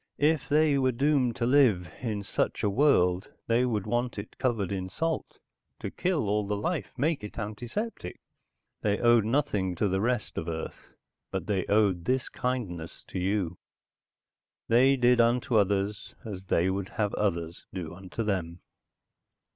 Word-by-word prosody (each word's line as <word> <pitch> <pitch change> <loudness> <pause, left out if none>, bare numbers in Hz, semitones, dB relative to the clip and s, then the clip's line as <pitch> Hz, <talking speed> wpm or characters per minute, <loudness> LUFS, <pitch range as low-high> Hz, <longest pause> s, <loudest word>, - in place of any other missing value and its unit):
"If 150 0 +2
they 150 -1 +4
were 130 -1 +3
doomed 130 -2 +2
to 120 - -1
live 120 -9 +4
in 110 -5 -2
such - - -1
a 105 - +2
world, 95 -8 +3 0.2
they 115 +2 +3
would 110 -5 -1
want 120 0 -1
it 100 +1 -8
covered 115 -8 0
in 95 -1 -3
salt, 165 - -3 0.4
to - - -5
kill 175 - 0
all 105 +1 +1
the 105 0 -1
life, 155 - -2
make 150 0 0
it 105 - -8
antiseptic. 115 - -5 0.6
They 105 -1 +1
owed 120 -2 +4
nothing 110 -8 0
to 105 - +1
the 95 0 0
rest 120 -1 -1
of 80 - -6
Earth, 80 -1 -6 0.3
but - - -3
they 100 -3 -1
owed 100 -5 +2
this 130 +2 0
kindness 100 -11 -4
to - - -3
you. 90 -2 -1 1.1
They 130 +4 +5
did 125 -1 +4
unto 120 +1 +2
others, 100 0 +1
as 95 -3 -6
they 90 -1 +2
would 95 0 -3
have 105 -2 -1
others 85 -4 -2
do 85 -4 -5
unto 95 +5 -5
them." 90 -5 -2
105 Hz, 160 wpm, -28 LUFS, 95-125 Hz, 1.1 s, They